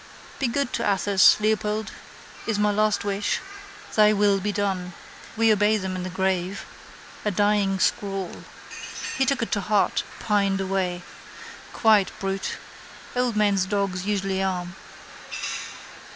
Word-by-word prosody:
Be 270 - +1
good 255 +2 -1
to - - -1
Athos, 195 +1 +5
Leopold, 215 0 0 0.6
is 220 -2 0
my 210 0 +2
last 215 0 +1
wish. 200 0 0 0.6
Thy 215 0 +6
will 200 -1 +3
be 205 +2 -1
done. 190 -3 -2 0.4
We 225 -1 +5
obey 210 +1 +3
them 190 -2 -4
in 185 - -3
the 185 - -4
grave. 190 +1 -1 0.6
A 210 - +1
dying 205 -1 +2
scrawl. 195 -1 -1 0.7
He 265 0 +1
took 270 -3 +1
it - - -5
to 205 - +1
heart, 210 -1 +2 0.2
pined 200 -2 +1
away. 185 -2 -1 0.7
Quiet 215 -4 +4
brute. 195 0 -3 0.6
Old 245 -2 +1
men's 200 -3 +2
dogs 195 -2 -1
usually 195 -2 0
are. 180 -2 -1
200 Hz, 135 wpm, -24 LUFS, 190-210 Hz, 0.7 s, Thy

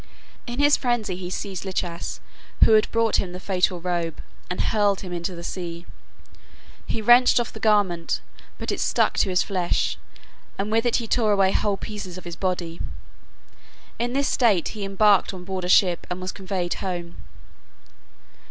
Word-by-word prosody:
In 240 0 -5
his 290 +1 +5
frenzy 240 -7 -1
he 180 0 -6
seized 190 0 -4
Lichas, 180 -3 -4 0.4
who - - +6
had 215 -1 +5
brought 230 -1 +2
him 180 -2 -2
the 180 - -6
fatal 185 -1 0
robe, 170 -2 -2 0.3
and 180 - -4
hurled 205 -2 +2
him 180 -2 -6
into 175 +1 -3
the 170 - -8
sea. 170 -1 -5 1.0
He 220 - -3
wrenched 245 +2 +6
off 240 - -3
the 220 - -8
garment, 200 -6 +2 0.4
but - - -3
it - - -3
stuck - - +2
to - - +2
his 180 -1 +2
flesh, 185 -4 -1 0.6
and 200 +2 -2
with 225 +2 +2
it 240 - +2
he 230 - -1
tore 220 -1 +2
away 195 -1 +3
whole 205 -1 +1
pieces 200 -4 -7
of 185 - -9
his 170 -1 -6
body. 175 -3 -3 1.2
In 240 +1 -1
this 280 +1 +1
state 215 - +2
he 210 - -6
embarked 195 0 +3
on 180 - -9
board 185 -1 -4
a - - -3
ship 180 -2 +4
and 180 0 -3
was 185 0 -4
conveyed 185 -2 -3
home. 175 -3 -5
190 Hz, 175 wpm, -24 LUFS, 180-215 Hz, 1.2 s, who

